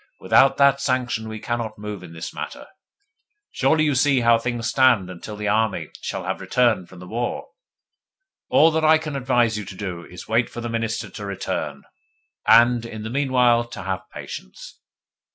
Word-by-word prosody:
Without 135 - +4
that 140 -1 +4
sanction 125 -4 -1
we 110 0 -6
cannot 115 0 -3
move 105 0 -6
in 90 -3 -11
the 80 0 -6
matter. - - -7 0.9
Surely 155 +4 +2
you 150 -2 +2
see 135 -1 +3
how 115 -1 +4
things 120 0 -3
stand 120 -7 +3
until 90 +4 -8
the 105 0 -4
army 110 -1 0
shall - - -4
have - - -3
returned 120 -8 +1
from 95 - -14
the 90 - -10
war? 120 +4 -3 1.0
All 165 - +5
that 160 0 0
I 155 0 +6
can 155 -2 -6
advise 120 -4 +1
you 105 - -6
to 95 - -9
do 90 -3 -5
is 90 +2 -11
wait 115 +2 +1
for - - -8
the 120 0 -4
Minister 115 -1 -2
to 105 - -8
return, 75 -7 -4 0.6
and, 120 0 +6
in 110 -2 -7
the 110 - -5
meanwhile, 125 -3 +3
to 120 - -9
have 95 -1 -4
patience. 60 - -9
115 Hz, 180 wpm, -22 LUFS, 105-130 Hz, 1.0 s, I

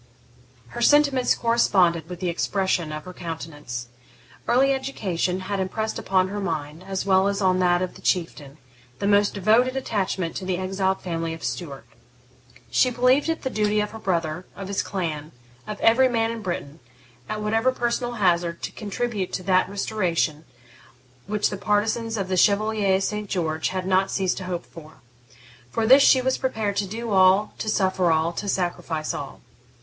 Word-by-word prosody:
Her 240 - -6
sentiments 280 -1 +4
corresponded 185 -8 +2
with 180 0 -8
the 180 - 0
expression 175 -2 0
of 155 0 -6
her 185 - -8
countenance. 150 -8 -6 0.6
Early 270 +3 +4
education 190 -9 -2
had 195 +1 -3
impressed 220 +4 -2
upon 185 -1 +1
her 205 +1 -4
mind, 160 -3 -4
as 195 -1 -3
well 190 0 +4
as 200 0 -1
on 185 -2 +2
that 175 0 +3
of 185 - -4
the - - -14
Chieftain, 155 -5 -2 0.4
the 200 - -3
most 205 0 +3
devoted 225 +6 +3
attachment 190 -8 -2
to - - -6
the 185 -1 -1
exiled 190 +1 -1
family 165 -2 -3
of 165 - -13
Stuart. 135 0 -5 0.9
She 255 - +4
believed 250 +5 +2
it 325 - -2
the 260 - -2
duty 210 0 +1
of 210 0 -1
her 225 - -9
brother, 170 -3 -2
of 195 -1 -7
his 200 - 0
clan, 160 -5 -4 0.3
of 210 -1 -5
every 255 +3 +5
man 225 -1 +1
in 230 -1 -6
Britain, 170 -5 -5 0.5
at 215 0 -3
whatever 225 +4 +2
personal 240 -1 -2
hazard, 175 -5 +1
to - - -3
contribute 210 -2 -3
to 185 - -3
that 185 0 +2
restoration 175 -6 -1 0.8
which 210 0 0
the 200 - -4
partisans 220 +3 0
of 195 -2 -2
the 185 0 -1
Chevalier 205 -1 +3
St. 210 +1 -3
George 160 -3 -1
had 185 -1 -3
not 190 +1 +2
ceased 190 -2 0
to 185 - -5
hope 180 -1 -4
for. 160 -1 -13 0.8
For 225 - -1
this 265 +5 +8
she 260 -2 +5
was 260 0 0
prepared 220 -6 -1
to 200 - 0
do 225 +3 -5
all, 190 +2 +4
to 215 - -2
suffer 185 -4 +2
all, 160 +1 +1
to 200 +3 -4
sacrifice 175 -4 -2
all. 140 -1 -7
190 Hz, 175 wpm, -24 LUFS, 175-220 Hz, 0.9 s, this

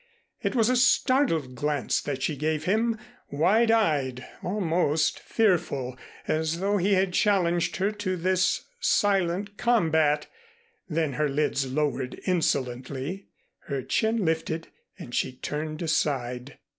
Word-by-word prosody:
It - - -1
was 225 -3 +4
a 255 - +3
startled 250 - +3
glance 145 +1 -1
that 135 -2 -4
she 155 - 0
gave 155 +2 -1
him, 220 +5 +1 0.3
wide 205 +11 +3
eyed, 145 - +1 0.2
almost 170 -5 0
fearful, 155 - 0 0.3
as 160 +1 0
though 200 +2 +1
he 200 +2 +2
had 190 -1 +1
challenged 175 -4 +2
her 195 +3 +1
to 205 -3 -3
this 185 +1 +1
silent 200 - +1
combat. 160 -10 +2 0.6
Then 155 -3 0
her 150 +2 0
lids 140 -2 0
lowered 135 -3 -1
insolently, 140 0 -1 0.4
her 140 -2 -2
chin 220 -2 +1
lifted 160 0 -1 0.3
and 120 - -10
she 130 - 0
turned 155 +5 -4
aside. 130 -5 -1
160 Hz, 125 wpm, -26 LUFS, 145-195 Hz, 0.6 s, was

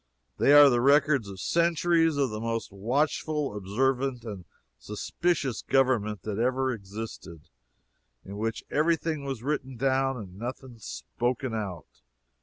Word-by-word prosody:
"They - - +4
are 145 0 +10
the 120 -3 +3
records 140 -4 +3
of 95 -1 -9
centuries 165 - +2
of 135 -4 +1
the 110 - -4
most 115 -1 -3
watchful, 140 +5 -1
observant 125 +5 -1
and 100 -5 -7 0.3
suspicious 135 +4 -2
government 125 -6 +1
that 105 -1 -3
ever 130 +2 +1
existed 100 -6 -8 0.8
in 100 +1 -8
which 110 +1 -3
every 160 +3 +3
thing 155 -3 -4
was 135 -4 -4
written 135 -3 -3
down 135 0 +1
and 95 -4 -9
nothing 125 0 -7
spoken 120 - -3
out." 95 - -6
125 Hz, 135 wpm, -27 LUFS, 105-140 Hz, 0.8 s, are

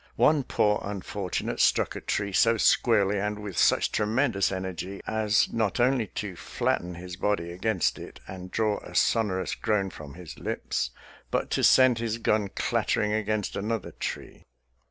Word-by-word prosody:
One 150 -1 +4
poor 105 -5 +1
unfortunate 100 -1 -4
struck - - +3
a - - -5
tree 100 -1 -2
so 115 +4 +4
squarely 105 -3 +3
and 105 +1 -2
with 105 -3 -7
such - - +3
tremendous 110 -2 +1
energy 95 0 -5
as 110 -2 +1
not 110 0 0
only 125 -2 +2
to 95 -1 -5
flatten 90 +1 -2
his 90 0 -8
body 95 -4 -1
against 95 0 0
it - - -10
and 95 -1 -8
draw 110 +1 0
a - - -12
sonorous 100 -5 +1
groan 100 -3 0
from 75 -2 -10
his 90 -3 -10
lips, 65 - -2 0.4
but - - -1
to - - 0
send 130 -3 +6
his 115 -1 -2
gun 110 -3 +1
clattering 105 +2 0
against 110 -1 -1
another 110 +1 -3
tree. - - -6
105 Hz, 155 wpm, -27 LUFS, 95-110 Hz, 0.4 s, send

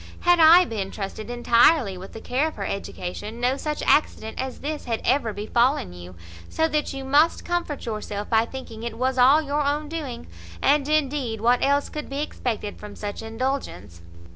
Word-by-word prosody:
Had 350 0 +4
I 335 +3 +8
been 205 - -4
trusted 210 +3 -6
entirely 240 - +3
with 185 +1 -10
the 225 - -8
care 265 +5 0
of 315 - -7
her - - -4
education, 200 +3 -5
no 250 +2 +1
such 300 +2 -4
accident 220 -7 +1
as 260 -1 -6
this 300 +1 -4
had 230 -2 -1
ever 250 -3 +2
befallen 220 - 0
you; 90 +1 -11 0.3
so 320 - +1
that 300 -1 -1
you 270 -1 -6
must 295 +5 +3
comfort 350 -5 -2
yourself 210 -2 -4
by 225 0 +3
thinking 235 -4 -8
it 235 -1 -5
was 260 +1 0
all 275 +5 +6
your 290 +1 -1
own 295 +1 -1
doing; 305 - -5 0.3
and, 290 - +2
indeed, 275 -7 0
what 240 +3 +3
else 280 +1 +2
could 300 - -7
be 280 +2 -2
expected 225 -8 -4
from 210 -1 -9
such 205 0 -5
indulgence?" 225 - -4
255 Hz, 185 wpm, -24 LUFS, 220-295 Hz, 0.3 s, I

